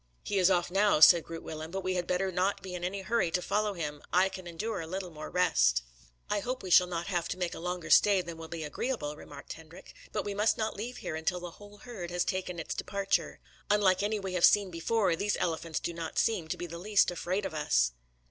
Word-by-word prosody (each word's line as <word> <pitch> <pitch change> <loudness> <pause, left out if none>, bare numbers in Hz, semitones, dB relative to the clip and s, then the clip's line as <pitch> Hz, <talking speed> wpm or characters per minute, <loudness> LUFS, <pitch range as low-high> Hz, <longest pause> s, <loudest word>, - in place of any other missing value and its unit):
"He 200 - 0
is 185 0 +5
off 175 -2 +1
now," 200 -3 +3
said 165 +1 +8
Groot 165 -1 -8
Willem, 155 0 -6
"but 190 +2 -4
we 185 - 0
had 175 -1 -2
better 185 +1 0
not 185 +3 0
be 185 -1 -7
in 180 -1 -5
any 190 +2 -3
hurry 215 -4 +1
to 180 - 0
follow 210 +3 0
him. 150 -4 -4
I 185 +3 +4
can 185 -2 -9
endure 190 +4 -3
a 160 - -7
little 185 +1 -5
more 155 -1 -8
rest." - - +3 0.4
"I 210 - 0
hope 250 +4 -4
we 185 - -5
shall 180 +1 +7
not 170 -1 -3
have 175 -4 -1
to - - -4
make 180 -2 -2
a - - -7
longer 180 0 -4
stay 200 -3 +6
than 170 -1 -7
will 165 - -7
be 160 0 -5
agreeable," 150 - -3
remarked 145 -1 -10
Hendrik. 165 +3 -13 0.2
"But 210 - -2
we 205 - -2
must 210 +2 +2
not 220 0 -2
leave 240 +4 -5
here - - -5
until 165 +3 -1
the 175 -1 -7
whole 205 +3 -14
herd 205 -6 -7
has 175 0 0
taken 185 -1 -3
its 165 - -4
departure. 200 -1 -1 0.3
Unlike 200 -3 +3
any 210 +1 0
we 190 -2 -5
have 180 -2 -1
seen 200 -3 +5
before, 180 +2 +1
these 205 +4 -1
elephants 165 -1 -2
do 170 - -4
not 165 -1 -6
seem 200 -8 +1
to - - -3
be 175 - -4
the 170 0 -7
least 205 0 +3
afraid 185 +3 -2
of 190 - -4
us." 65 - +2
180 Hz, 245 wpm, -30 LUFS, 165-200 Hz, 0.4 s, said